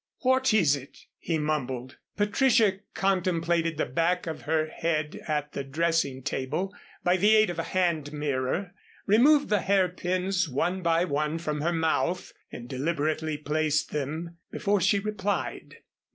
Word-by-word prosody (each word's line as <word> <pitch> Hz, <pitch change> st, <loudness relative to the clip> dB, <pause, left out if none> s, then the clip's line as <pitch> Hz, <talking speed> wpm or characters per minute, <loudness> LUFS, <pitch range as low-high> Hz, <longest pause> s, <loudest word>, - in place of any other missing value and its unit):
"What 260 Hz, 0 st, +3 dB
is 165 Hz, -10 st, +4 dB
it?" 140 Hz, -1 st, -11 dB
he 165 Hz, -, -1 dB
mumbled. 130 Hz, -4 st, -3 dB, 0.2 s
Patricia 210 Hz, -1 st, +3 dB, 0.2 s
contemplated 170 Hz, -4 st, +1 dB
the -, -, +1 dB
back 170 Hz, +7 st, 0 dB
of 160 Hz, -2 st, -5 dB
her 160 Hz, -1 st, +2 dB
head 155 Hz, -1 st, -2 dB
at 150 Hz, -1 st, -1 dB
the 140 Hz, -, -4 dB
dressing 145 Hz, -2 st, 0 dB
table 150 Hz, +8 st, -2 dB, 0.3 s
by 180 Hz, +1 st, +3 dB
the 210 Hz, +3 st, +5 dB
aid 215 Hz, -4 st, +4 dB
of 170 Hz, -, -6 dB
a 165 Hz, -, -3 dB
hand 170 Hz, -6 st, 0 dB
mirror, 150 Hz, +5 st, -2 dB, 0.3 s
removed 280 Hz, +8 st, +5 dB
the 205 Hz, -2 st, +2 dB
hairpins 185 Hz, -1 st, +1 dB
one 175 Hz, +8 st, -1 dB
by 170 Hz, 0 st, +2 dB
one 150 Hz, 0 st, -1 dB
from 150 Hz, -3 st, -3 dB
her 170 Hz, +3 st, +1 dB
mouth 165 Hz, +2 st, 0 dB, 0.2 s
and 120 Hz, -, -8 dB
deliberately 155 Hz, +3 st, -1 dB
placed 150 Hz, 0 st, 0 dB
them 160 Hz, +4 st, -4 dB
before 205 Hz, -1 st, 0 dB
she 195 Hz, +4 st, +3 dB
replied. 205 Hz, -1 st, -3 dB
165 Hz, 145 wpm, -27 LUFS, 150-190 Hz, 0.3 s, the